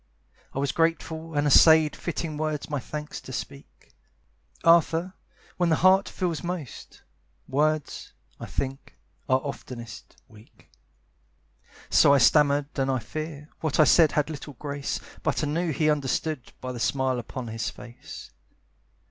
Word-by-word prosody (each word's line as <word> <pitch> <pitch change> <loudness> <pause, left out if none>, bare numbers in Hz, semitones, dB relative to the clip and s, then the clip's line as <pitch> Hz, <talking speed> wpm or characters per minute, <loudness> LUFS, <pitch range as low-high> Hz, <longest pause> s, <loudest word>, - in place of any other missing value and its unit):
I - - -4
was 140 0 0
grateful 165 -1 -1
and 145 0 +1
essayed 155 +1 +6
Fitting 165 -2 -4
words 155 0 -3
my 145 - -1
thanks 150 +4 -7
to - - -10
speak. 70 - -9 0.7
Arthur, 170 +2 +4 0.4
when 175 -1 +2
the 160 - +4
heart 190 +3 +4
feels 175 -5 -3
most, 175 -8 -7 0.4
Words, 150 +2 -1 0.3
I - - -7
think, 135 +1 -5 0.3
are 130 0 +4
oftenest 125 -4 -8
weak. 110 0 -20 1.2
So 140 - +6
I - - +5
stammered 145 +1 +4
and 135 0 +1
I 130 - +1
fear, 150 +5 -6
What 155 -2 -2
I - - +9
said 155 +1 +5
had 150 +1 0
little 145 -1 -8
grace 140 +1 -4 0.2
But - - -1
I - - 0
knew 165 +4 -1
he 155 +1 0
understood, 150 -1 -2
By 130 0 -4
the 125 - -6
smile 130 0 0
upon 120 0 -6
his 110 0 -3
face. 120 +1 -11
150 Hz, 145 wpm, -26 LUFS, 135-160 Hz, 1.2 s, I